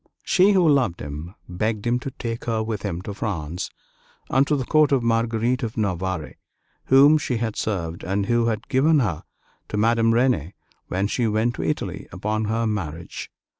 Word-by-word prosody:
She, 195 Hz, +2 st, +4 dB
who 185 Hz, -4 st, +4 dB
loved 130 Hz, -, +2 dB
him, 75 Hz, +5 st, -7 dB
begged 105 Hz, +4 st, -2 dB
him 120 Hz, +1 st, +1 dB
to 135 Hz, -, -5 dB
take 115 Hz, -3 st, -5 dB
her 110 Hz, -2 st, 0 dB
with 110 Hz, -2 st, -3 dB
him 90 Hz, -3 st, -4 dB
to 105 Hz, -, -5 dB
France 90 Hz, -5 st, -3 dB, 0.6 s
and 135 Hz, +1 st, +3 dB
to 150 Hz, -, +2 dB
the 135 Hz, -3 st, -2 dB
court 155 Hz, +1 st, +4 dB
of 135 Hz, -3 st, +2 dB
Marguerite 115 Hz, +2 st, +1 dB
of 115 Hz, -2 st, -4 dB
Navarre, 95 Hz, -5 st, -2 dB, 0.5 s
whom 145 Hz, +4 st, +6 dB
she 125 Hz, -4 st, -1 dB
had 110 Hz, -2 st, -2 dB
served, 85 Hz, -6 st, -3 dB
and 100 Hz, +1 st, -1 dB
who 120 Hz, +1 st, +2 dB
had 110 Hz, -1 st, -2 dB
given 150 Hz, +5 st, +3 dB
her 90 Hz, -10 st, -1 dB, 0.5 s
to 105 Hz, -, -3 dB
Madame 115 Hz, +1 st, +3 dB
Renée 115 Hz, -, +1 dB, 0.3 s
when 95 Hz, +2 st, -1 dB
she 115 Hz, +3 st, 0 dB
went 110 Hz, +3 st, +1 dB
to -, -, -4 dB
Italy -, -, -3 dB
upon 105 Hz, +3 st, -2 dB
her 115 Hz, +2 st, 0 dB
marriage. 85 Hz, -7 st, -4 dB
110 Hz, 180 wpm, -23 LUFS, 95-120 Hz, 0.6 s, whom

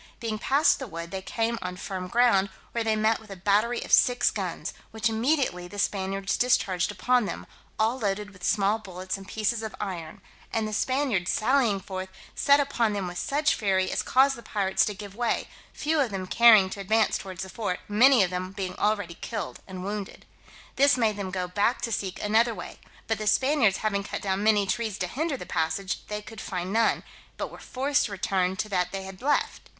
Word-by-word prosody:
Being 220 Hz, -2 st, -3 dB
passed 275 Hz, +6 st, +3 dB
the 265 Hz, -, -5 dB
wood, 170 Hz, -3 st, -7 dB
they 190 Hz, -, -4 dB
came 230 Hz, +3 st, -2 dB
on 180 Hz, 0 st, -4 dB
firm 185 Hz, 0 st, -5 dB
ground, 200 Hz, -2 st, +3 dB, 0.2 s
where 235 Hz, -, -1 dB
they 220 Hz, -1 st, +1 dB
met 220 Hz, +1 st, +2 dB
with 220 Hz, -, -16 dB
a 195 Hz, -, -7 dB
battery 210 Hz, +6 st, +1 dB
of -, -, -5 dB
six 245 Hz, 0 st, +5 dB
guns, -, -, -4 dB, 0.2 s
which 220 Hz, +1 st, 0 dB
immediately 225 Hz, -, 0 dB
the 205 Hz, -, -10 dB
Spaniards 195 Hz, -1 st, -1 dB
discharged 195 Hz, -7 st, +2 dB
upon 245 Hz, +3 st, +2 dB
them, -, -, -5 dB, 0.3 s
all 225 Hz, +4 st, +1 dB
loaded 205 Hz, -1 st, -2 dB
with 185 Hz, -2 st, -17 dB
small 205 Hz, +3 st, +2 dB
bullets 185 Hz, -2 st, -5 dB
and 195 Hz, -1 st, -10 dB
pieces 220 Hz, +2 st, -1 dB
of 220 Hz, -1 st, -6 dB
iron; 175 Hz, -6 st, -5 dB, 0.3 s
and 220 Hz, -1 st, 0 dB
the 215 Hz, -, -5 dB
Spaniards 255 Hz, -7 st, 0 dB
sallying 235 Hz, -3 st, +2 dB
forth, 190 Hz, 0 st, -6 dB, 0.2 s
set 280 Hz, +1 st, +4 dB
upon 240 Hz, -6 st, +1 dB
them 200 Hz, -2 st, -2 dB
with 175 Hz, 0 st, -5 dB
such 295 Hz, +2 st, +1 dB
fury, 190 Hz, -3 st, +1 dB
as -, -, 0 dB
caused 270 Hz, +1 st, +3 dB
the 235 Hz, -, -10 dB
pirates 200 Hz, -4 st, +1 dB
to 210 Hz, -, -3 dB
give 200 Hz, -1 st, -9 dB
way, 240 Hz, +1 st, -1 dB, 0.2 s
few 310 Hz, +1 st, 0 dB
of 270 Hz, -4 st, +2 dB
them 190 Hz, -2 st, -4 dB
caring 220 Hz, -1 st, +7 dB
to -, -, -6 dB
advance 215 Hz, +3 st, +2 dB
towards 190 Hz, -1 st, -6 dB
the -, -, -7 dB
fort, 190 Hz, -2 st, -3 dB
many 240 Hz, +2 st, +6 dB
of 180 Hz, -, -1 dB
them 185 Hz, +1 st, -4 dB
being 190 Hz, -2 st, -4 dB
already 205 Hz, -5 st, 0 dB
killed 225 Hz, -3 st, -5 dB
and 185 Hz, -1 st, -7 dB
wounded. 205 Hz, 0 st, -5 dB, 0.5 s
This 280 Hz, 0 st, +5 dB
made 220 Hz, -3 st, +2 dB
them 200 Hz, -2 st, -4 dB
go 185 Hz, -1 st, -2 dB
back 205 Hz, +7 st, +1 dB
to 230 Hz, -, -2 dB
seek 190 Hz, -4 st, -3 dB
another 225 Hz, +2 st, +3 dB
way; 175 Hz, -, -9 dB, 0.3 s
but 225 Hz, -1 st, -1 dB
the 215 Hz, -, -3 dB
Spaniards 235 Hz, -2 st, +3 dB
having 200 Hz, -2 st, +1 dB
cut -, -, -5 dB
down 195 Hz, 0 st, 0 dB
many 210 Hz, -1 st, +4 dB
trees 220 Hz, 0 st, -2 dB
to 180 Hz, -, -1 dB
hinder 285 Hz, -, -2 dB
the -, -, -8 dB
passage, 165 Hz, +4 st, -1 dB
they 210 Hz, 0 st, -4 dB
could 225 Hz, 0 st, -9 dB
find 180 Hz, +1 st, -4 dB
none, 225 Hz, 0 st, +2 dB, 0.3 s
but -, -, -4 dB
were -, -, -11 dB
forced 280 Hz, +3 st, 0 dB
to -, -, -11 dB
return 190 Hz, -1 st, 0 dB
to 215 Hz, +2 st, -2 dB
that 180 Hz, -3 st, 0 dB
they 195 Hz, -1 st, -4 dB
had 190 Hz, -1 st, -10 dB
left. 290 Hz, +3 st, 0 dB
210 Hz, 210 wpm, -27 LUFS, 190-235 Hz, 0.5 s, caring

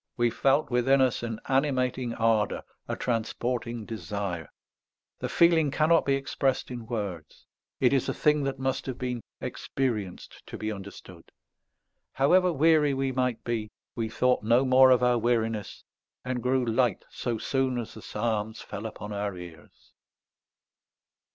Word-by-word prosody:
We 120 Hz, -1 st, +2 dB
felt 135 Hz, +4 st, +2 dB
within 130 Hz, +3 st, +3 dB
us 130 Hz, -2 st, +2 dB
an 115 Hz, -2 st, -4 dB
animating 130 Hz, -3 st, 0 dB
ardour, 110 Hz, -2 st, +1 dB, 0.2 s
a -, -, -2 dB
transporting 120 Hz, 0 st, -2 dB
desire. 100 Hz, -7 st, -4 dB, 0.7 s
The -, -, -3 dB
feeling 165 Hz, -3 st, +4 dB
cannot 155 Hz, +4 st, +3 dB
be 140 Hz, -, +3 dB
expressed 135 Hz, -1 st, -1 dB
in 120 Hz, -2 st, -7 dB
words. 100 Hz, -, -5 dB, 0.3 s
It 130 Hz, 0 st, +4 dB
is 135 Hz, -, +1 dB
a -, -, 0 dB
thing 150 Hz, -1 st, +2 dB
that 135 Hz, 0 st, -2 dB
must 130 Hz, 0 st, -2 dB
have 130 Hz, -2 st, -4 dB
been 125 Hz, -2 st, -3 dB, 0.2 s
experienced 110 Hz, -9 st, -3 dB
to -, -, -7 dB
be 110 Hz, 0 st, -3 dB
understood. 95 Hz, -3 st, -10 dB, 0.9 s
However 180 Hz, +7 st, +4 dB
weary 155 Hz, -2 st, +4 dB
we 135 Hz, 0 st, 0 dB
might 125 Hz, -2 st, -1 dB
be, 110 Hz, -3 st, -2 dB, 0.2 s
we 115 Hz, -2 st, -3 dB
thought 125 Hz, +3 st, +2 dB
no 120 Hz, +5 st, +3 dB
more 130 Hz, 0 st, +7 dB
of 125 Hz, -1 st, +4 dB
our 125 Hz, -1 st, +3 dB
weariness, 115 Hz, -2 st, -1 dB, 0.4 s
and 125 Hz, -1 st, -2 dB
grew 125 Hz, 0 st, +1 dB
light 115 Hz, -2 st, +1 dB
so 120 Hz, -2 st, -3 dB
soon 130 Hz, +2 st, 0 dB
as 120 Hz, -2 st, -5 dB
the 110 Hz, -, -11 dB
psalms 110 Hz, -1 st, -2 dB
fell 105 Hz, +3 st, -6 dB
upon 105 Hz, -1 st, -7 dB
our 100 Hz, -2 st, -3 dB
ears." 85 Hz, -2 st, -13 dB
120 Hz, 150 wpm, -27 LUFS, 110-135 Hz, 0.9 s, more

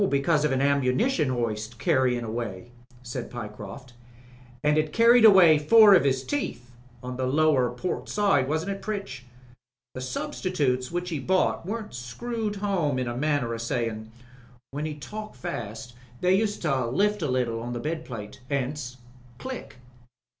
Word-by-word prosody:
"Because 145 Hz, +2 st, +2 dB
of 150 Hz, -, +1 dB
an 135 Hz, 0 st, +1 dB
ammunition 140 Hz, -, +2 dB
hoist 115 Hz, -2 st, -3 dB
carryin' 125 Hz, 0 st, +1 dB
away," 115 Hz, -1 st, -5 dB, 0.3 s
said 120 Hz, -1 st, -5 dB
Pyecroft. 115 Hz, +2 st, -8 dB, 0.7 s
"And 150 Hz, 0 st, +3 dB
it 155 Hz, 0 st, +1 dB
carried 230 Hz, +2 st, +6 dB
away 180 Hz, -7 st, +8 dB
four 210 Hz, +7 st, +7 dB
of 170 Hz, -7 st, +5 dB
'is 130 Hz, -1 st, 0 dB
teeth 125 Hz, -, -4 dB, 0.2 s
— 120 Hz, -1 st, -26 dB
on 125 Hz, 0 st, -5 dB
the 130 Hz, -1 st, -1 dB
lower 140 Hz, -2 st, +3 dB
port 125 Hz, +9 st, -4 dB
side, 195 Hz, -11 st, +2 dB
wasn't 160 Hz, +6 st, -1 dB
it, 195 Hz, -, -5 dB
Pritch? 195 Hz, -12 st, -5 dB, 0.7 s
The 130 Hz, -, -6 dB
sub 290 Hz, -, -4 dB
stitutes 135 Hz, -9 st, -1 dB
which 175 Hz, +1 st, -3 dB
he 155 Hz, -, -2 dB
bought 185 Hz, +3 st, +1 dB
weren't 220 Hz, -, -5 dB
screwed 210 Hz, -, -4 dB
home 190 Hz, -9 st, 0 dB
in 130 Hz, -1 st, -1 dB
a 120 Hz, -, -3 dB
manner 140 Hz, -3 st, 0 dB
o' -, -, -3 dB
sayin'. 115 Hz, -2 st, -3 dB, 0.6 s
When 145 Hz, +3 st, -3 dB
he 150 Hz, -, -5 dB
talked 210 Hz, +8 st, -8 dB
fast 120 Hz, -6 st, -6 dB, 0.3 s
they 180 Hz, +1 st, +3 dB
used 205 Hz, 0 st, 0 dB
to 135 Hz, -6 st, +1 dB
lift 205 Hz, -, +1 dB
a 150 Hz, -, -1 dB
little 120 Hz, -3 st, -1 dB
on 120 Hz, +1 st, -5 dB
the 120 Hz, -, -3 dB
bed 155 Hz, +4 st, -3 dB
plate. 110 Hz, -4 st, -8 dB
'Ence, 135 Hz, -2 st, -3 dB, 0.4 s
'Click.' 260 Hz, -1 st, -7 dB
140 Hz, 165 wpm, -26 LUFS, 120-185 Hz, 0.7 s, away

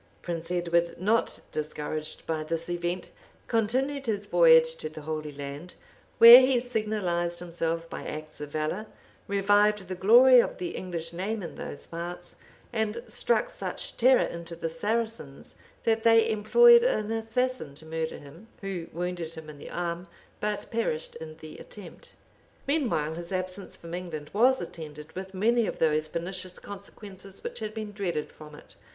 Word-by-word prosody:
{1271.} 175 Hz, -, -2 dB
Prince 170 Hz, 0 st, 0 dB
Edward, -, -, -17 dB
not 225 Hz, +2 st, +1 dB
discouraged 155 Hz, 0 st, -4 dB
by 160 Hz, -1 st, -2 dB
this 165 Hz, +2 st, -3 dB
event, 175 Hz, +1 st, -3 dB, 0.3 s
continued 260 Hz, +5 st, 0 dB
his 205 Hz, -2 st, -1 dB
voyage 160 Hz, -3 st, +6 dB
to 155 Hz, -, -5 dB
the 155 Hz, 0 st, -10 dB
Holy 155 Hz, -1 st, -4 dB
Land, 145 Hz, +4 st, -7 dB, 0.4 s
where 235 Hz, +2 st, +12 dB
he 260 Hz, -1 st, +3 dB
signalized 210 Hz, -8 st, -1 dB
himself 165 Hz, -1 st, -3 dB
by -, -, -7 dB
acts 155 Hz, 0 st, -7 dB
of 150 Hz, -, -5 dB
valor; 155 Hz, +8 st, -2 dB, 0.4 s
revived 205 Hz, 0 st, +3 dB
the 185 Hz, -, -4 dB
glory 240 Hz, +7 st, +7 dB
of -, -, +1 dB
the 180 Hz, -1 st, -3 dB
English 170 Hz, -3 st, -5 dB
name 200 Hz, +4 st, -3 dB
in 165 Hz, -, -6 dB
those 145 Hz, -, -8 dB
parts; 170 Hz, +1 st, -7 dB, 0.4 s
and 220 Hz, +1 st, -1 dB
struck 485 Hz, +1 st, +1 dB
such -, -, -5 dB
terror 255 Hz, +1 st, +5 dB
into 170 Hz, 0 st, -6 dB
the 165 Hz, -, -3 dB
Saracens, 210 Hz, -4 st, -3 dB, 0.3 s
that 225 Hz, -1 st, +2 dB
they 225 Hz, 0 st, +5 dB
employed 475 Hz, -, +7 dB
an 220 Hz, -, 0 dB
assassin 225 Hz, -, -1 dB
to 160 Hz, -, -14 dB
murder 160 Hz, 0 st, -3 dB
him, 160 Hz, +10 st, -14 dB
who 190 Hz, -4 st, -4 dB
wounded 175 Hz, -1 st, -4 dB
him 155 Hz, -1 st, -9 dB
in 145 Hz, -, -14 dB
the -, -, -9 dB
arm, 175 Hz, 0 st, -3 dB, 0.3 s
but 210 Hz, -1 st, -2 dB
perished 225 Hz, -9 st, -2 dB
in 155 Hz, -1 st, -9 dB
the 155 Hz, -, -10 dB
attempt.[*] 200 Hz, -5 st, -12 dB, 0.5 s
Meanwhile 245 Hz, -, 0 dB
his 170 Hz, +2 st, -7 dB
absence 185 Hz, +1 st, -4 dB
from 170 Hz, 0 st, -10 dB
England 170 Hz, -4 st, -6 dB
was 255 Hz, +5 st, +4 dB
attended 150 Hz, -1 st, -9 dB
with 190 Hz, +1 st, -7 dB
many 230 Hz, +3 st, +2 dB
of -, -, -4 dB
those 155 Hz, -1 st, +2 dB
pernicious 180 Hz, +3 st, -5 dB
consequences 195 Hz, -1 st, -10 dB
which -, -, -5 dB
had 215 Hz, 0 st, -5 dB
been 215 Hz, -1 st, -5 dB
dreaded 185 Hz, -7 st, -3 dB
from 150 Hz, -1 st, -12 dB
it. -, -, -16 dB
180 Hz, 160 wpm, -28 LUFS, 160-220 Hz, 0.5 s, where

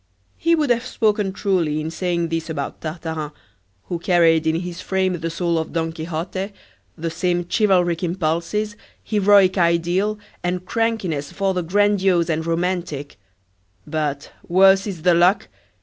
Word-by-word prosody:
He 335 Hz, 0 st, +2 dB
would 300 Hz, -5 st, +1 dB
have 235 Hz, 0 st, +2 dB
spoken 210 Hz, -5 st, +1 dB
truly 180 Hz, -7 st, 0 dB
in 155 Hz, +1 st, -4 dB
saying 170 Hz, -1 st, -1 dB
this 165 Hz, 0 st, -3 dB
about 145 Hz, -3 st, -4 dB
Tartarin, 160 Hz, -2 st, -4 dB, 0.5 s
who 175 Hz, -, -4 dB
carried 165 Hz, -2 st, +3 dB
in 160 Hz, -, +2 dB
his 175 Hz, -1 st, -6 dB
frame 190 Hz, -2 st, 0 dB
the 165 Hz, -, -3 dB
soul 170 Hz, 0 st, 0 dB
of 160 Hz, -, -5 dB
Don 165 Hz, -1 st, -1 dB
Quixote, 170 Hz, +5 st, -4 dB, 0.4 s
the 165 Hz, +1 st, -3 dB
same 175 Hz, +1 st, 0 dB
chivalric 180 Hz, -5 st, +2 dB
impulses, 175 Hz, +5 st, -1 dB, 0.3 s
heroic 200 Hz, -2 st, +4 dB
ideal, 175 Hz, +5 st, +1 dB, 0.3 s
and 180 Hz, +1 st, -2 dB
crankiness 200 Hz, -11 st, -1 dB
for 195 Hz, -1 st, 0 dB
the 180 Hz, -, -1 dB
grandiose 190 Hz, -1 st, +2 dB
and 160 Hz, 0 st, -1 dB
romantic; 165 Hz, -, -2 dB, 0.7 s
but, 150 Hz, -2 st, -3 dB, 0.2 s
worse 190 Hz, +2 st, +5 dB
is 180 Hz, -6 st, -6 dB
the 180 Hz, -1 st, +5 dB
luck! 175 Hz, +4 st, +3 dB
175 Hz, 145 wpm, -21 LUFS, 165-195 Hz, 0.7 s, worse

